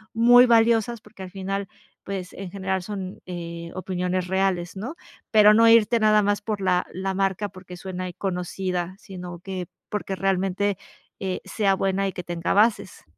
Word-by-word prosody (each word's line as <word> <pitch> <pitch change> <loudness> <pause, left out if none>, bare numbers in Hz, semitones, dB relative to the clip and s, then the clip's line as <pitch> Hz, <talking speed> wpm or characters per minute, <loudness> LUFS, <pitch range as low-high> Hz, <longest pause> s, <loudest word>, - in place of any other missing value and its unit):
muy 245 +2 +7
valiosas, 230 0 +3
porque 210 -3 -15
al 185 - -7
final, 195 0 -3 0.4
pues 190 -2 -5
en 195 -2 -7
general 190 -1 -2
son, 190 -2 -6
eh, 170 -1 -6
opiniones 185 -1 -2
reales, 190 -1 0
¿no?, 245 - -5 0.4
pero 210 -1 +7
no 230 +1 +6
irte 230 0 +5
nada 215 -1 +4
más 205 0 +1
por 210 -1 -3
la 180 -1 +1
la 190 +1 -2
marca, 195 +1 0
porque 185 -1 -11
suena 185 0 -5
ahí 180 - -6
conocida, 180 0 -3
sino 180 -2 -8
que 185 -1 -5 0.2
porque 200 -2 -3
realmente, 195 +1 0 0.4
eh, 190 -1 -3
sea 200 -3 +1
buena, 195 +1 0
y 190 - -4
que 180 - -6
tenga 170 -1 -2
bases. 205 -3 +2
195 Hz, 170 wpm, -24 LUFS, 185-205 Hz, 0.4 s, muy